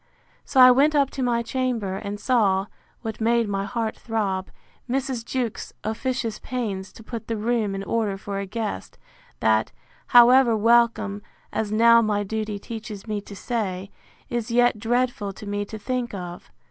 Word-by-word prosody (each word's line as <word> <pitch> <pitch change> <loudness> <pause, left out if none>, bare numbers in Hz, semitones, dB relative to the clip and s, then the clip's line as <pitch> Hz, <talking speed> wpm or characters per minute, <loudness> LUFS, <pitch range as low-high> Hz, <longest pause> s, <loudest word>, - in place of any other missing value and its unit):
So 265 - +1
I 255 0 +10
went 290 +4 +4
up 280 -2 +3
to 270 - -5
my 235 -2 +1
chamber, 235 -6 -2
and 205 0 -5
saw 200 -6 +2 0.4
(what 220 -1 -5
made 230 0 +2
my 195 -1 -2
heart 225 +1 -2
throb) 200 -5 -2 0.4
Mrs. 260 -2 -1
Jewkes's 240 -2 -3
officious 230 +1 -2
pains 205 -7 -4
to 225 - -13
put 230 0 -7
the 225 - -2
room 215 -2 0
in 195 - -4
order 210 -2 -1
for 195 0 -5
a 200 - -4
guest, 210 - -4 0.4
that, 110 0 +2 0.4
however 245 -1 +7
welcome, 230 -2 +3 0.3
as 215 -2 -1
now 230 +2 +6
my 210 -2 0
duty 215 0 -3
teaches 215 -1 -8
me 210 -2 -3
to 200 - -11
say, 195 -4 -3 0.4
is 240 -1 -3
yet 240 -1 +3
dreadful 235 -3 0
to 210 - -10
me 205 0 -2
to 220 - -7
think 240 +1 -3
of. 175 -2 -8
225 Hz, 165 wpm, -24 LUFS, 205-240 Hz, 0.4 s, I